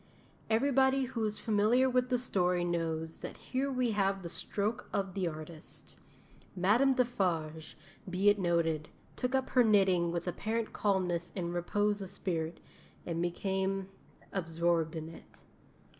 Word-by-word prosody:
Everybody 265 +3 +3
who 250 -3 -3
is 210 0 -1
familiar 220 +4 +3
with 250 0 +1
the 250 - +2
story 180 -7 +1
knows 165 -2 -2
that - - -7
here 270 +2 -2
we 250 -3 +1
have 195 -2 0
the 170 - -5
stroke 215 +7 -2
of 195 -2 -1
the 185 -2 -1
artist. 155 0 -9 0.6
Madame 225 +9 +4
Defarge, 175 - -1 0.3
be 185 +3 +1
it 205 0 +6
noted, 165 -4 +1 0.3
took 250 +1 -1
up 265 -1 0
her 250 - +5
knitting 190 -6 +4
with 170 +1 -3
apparent 220 +5 -2
calmness 180 -4 0
and 175 -3 -2
repose 205 +4 0
of 190 - -5
spirit, 165 -3 -3 0.5
and 170 -1 -2
became 190 +2 -1 0.4
absorbed 165 -2 0
in 160 -1 -4
it. 165 - -13
190 Hz, 145 wpm, -32 LUFS, 170-225 Hz, 0.6 s, it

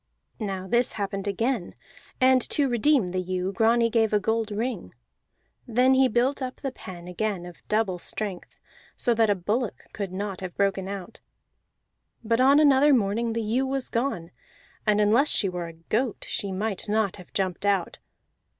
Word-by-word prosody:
Now 195 -3 -4
this 240 +3 +1
happened 195 -1 -3
again, 225 0 -1 0.4
and 255 0 +5
to 285 -2 +2
redeem 240 -4 +2
the 185 0 -1
ewe 185 +1 -2
Grani 230 +3 +3
gave 225 -2 +1
a 210 - +4
gold 220 +2 -1
ring. 210 - -4 0.7
Then 250 +3 +4
he 260 0 +5
built 255 +4 +1
up 255 -1 -3
the 270 - -5
pen 180 -7 -10
again 180 0 -2
of 175 -1 -12
double 210 -4 0
strength, 195 0 -5 0.4
so 240 - +2
that 225 -1 +3
a 205 - +3
bullock 210 +5 -2
could 200 -3 -4
not 195 0 -4
have 185 -2 -7
broken 195 -1 0
out; 195 +1 -7 1.0
but 230 +2 +1
on 275 +3 +6
another 285 -1 +5
morning 225 +1 0
the 230 0 -2
ewe 245 +5 0
was 270 -1 -2
gone, 230 -9 -2 0.6
and 210 0 +4
unless 220 +8 +4
she 200 - +3
were 180 -2 -4
a 165 - -9
goat 215 +8 -2
she 200 - -2
might 205 +1 -3
not 210 -2 +1
have 180 - -14
jumped 185 -2 -2
out. 200 -4 0
215 Hz, 170 wpm, -26 LUFS, 190-240 Hz, 1.0 s, on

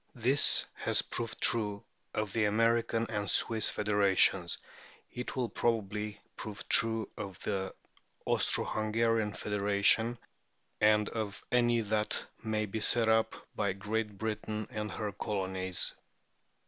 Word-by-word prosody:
" - - -38
This 140 +3 +5
has - - +1
proved 115 -1 -5
true 105 -3 +2 0.3
of 105 -2 -3
the 115 -2 +2
American 115 +2 +1
and 105 -3 -2
Swiss 110 +2 +4
federations; 100 -4 +2 0.5
it 125 - -6
will 125 -2 0
probably 105 -3 -2 0.2
prove 110 +2 -8
true 115 -2 +4
of 95 -2 -7
the 95 -2 -3 0.5
Austro - - +2
Hungarian 110 0 0
federation 105 +3 +2 0.6
and 105 0 +4
of 110 -3 -5
any 120 -1 +3
that 105 0 -1 0.2
may 110 -1 -1
be 105 +2 -4
set 115 +1 +3
up 110 0 +2 0.2
by 100 -2 0
Great 105 +1 -3
Britian 110 0 -3
[Transcriber: - - -25
sic.] - - -7
and 105 0 -4
her 105 -2 -3
colonies. 95 -3 -2
105 Hz, 135 wpm, -31 LUFS, 100-115 Hz, 0.6 s, This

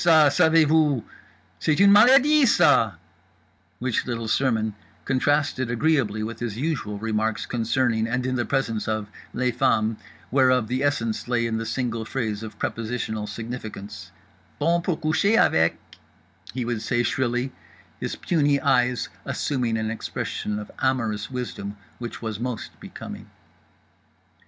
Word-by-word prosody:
Savez 160 0 +5
vous? 150 -5 +3 0.6
C'est 155 0 +1
une 200 0 +7
maladie, 265 +7 +6
ça,_" 110 - +4 0.8
which 125 -1 -1
little 115 -2 -3
sermon 110 -3 +1 0.3
contrasted 135 -1 +1
agreeably 120 -5 +1
with 115 +1 -5
his 115 -3 -4
usual 130 -8 -2
remarks 110 0 -1
concerning, 115 -1 0
and 125 +2 -1
in 130 - -1
the 120 - 0
presence 115 -6 -1
of, 110 -1 -2 0.2
les 125 0 0
femmes, 115 -3 +1 0.3
whereof 130 -3 +3
the 125 +3 -1
essence 120 -7 -1
lay 120 -1 +1
in 115 -1 -1
a 115 - -4
single 115 -3 -2
phrase 110 -3 -3
of 110 -1 -8
prepositional 110 -2 -3
significance— 105 -4 -7 0.5
"bon 170 +1 +2
pour 175 -2 -1
coucher 160 +7 +2
avec" 80 +1 +3 0.7
he 125 0 -3
would 120 -2 -2
say 120 +2 0
shrilly, 125 +1 0 0.5
his - - -3
puny 145 -4 +1
eyes 125 -1 +2 0.2
assuming 125 -5 -1
an 110 0 -2
expression 105 -1 -4
of 105 0 -7
amorous 115 -6 0
wisdom 105 -5 -5 0.2
which 120 -1 -7
was 110 -2 -4
most 125 -2 -4
becoming…. - - -9
120 Hz, 135 wpm, -24 LUFS, 110-140 Hz, 0.8 s, une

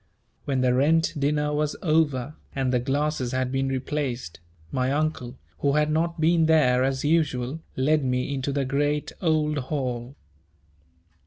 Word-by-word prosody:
When 135 -2 0
the 125 -1 +3
rent 160 +6 +3
dinner 150 +1 0
was 150 0 0
over, 155 -5 +1 0.2
and 130 -2 0
the 125 - +3
glasses 135 0 -1
had 130 0 -1
been 135 0 0
replaced, 130 - -3 0.3
my 130 0 0
Uncle, 145 -4 -2 0.2
who 140 -1 +1
had 150 0 +2
not 165 +2 0
been 165 0 +3
there 130 -6 +4
as 135 +1 -1
usual, 150 -3 +1 0.2
led 150 +3 +2
me 125 +1 -1
into 135 0 -2
the 140 -1 -1
great 145 +2 0
old 155 -3 +1
hall. 125 -2 -3
140 Hz, 150 wpm, -25 LUFS, 130-150 Hz, 0.3 s, there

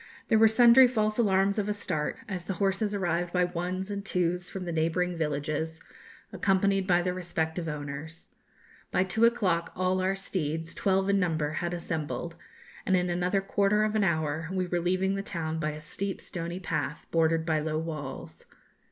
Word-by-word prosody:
There 220 -2 +5
were 225 - +8
sundry 240 +3 +7
false 215 -2 0
alarms 200 -1 +3
of 210 0 -1
a - - +1
start, 155 -7 -2
as 185 -4 -5
the 195 - -3
horses 200 +3 0
arrived 175 -2 -1
by 180 0 +2
ones 180 +2 -3
and 200 0 -4
twos 180 -3 -1
from 190 -2 -6
the 175 - -3
neighbouring 165 +2 0
villages, 155 +1 -2 0.5
accompanied 195 -1 +2
by 175 -1 +3
their 180 0 0
respective 170 -2 -2
owners. 150 +2 -6 0.6
By 185 - +2
two 220 +5 +2
o'clock 190 -8 +1
all 185 0 +1
our 190 +1 +1
steeds, 165 -4 -3
twelve 190 0 +1
in 200 0 +3
number, 160 -5 0
had 170 +2 -2
assembled, 165 -1 -4 0.5
and 190 - +3
in 180 0 0
another 180 +3 +1
quarter 200 +2 +2
of 215 0 0
an 215 -2 +2
hour 160 -2 0
we 185 -1 0
were 175 0 -1
leaving 185 +2 +1
the 195 - -2
town 160 -4 -3
by 155 -1 -1
a 150 0 -6
steep 190 +6 -3
stony 170 +1 -5
path, 160 -4 -3
bordered 165 0 +2
by 160 -2 +1
low 155 0 -2
walls. 155 -4 -6
180 Hz, 180 wpm, -28 LUFS, 160-195 Hz, 0.6 s, were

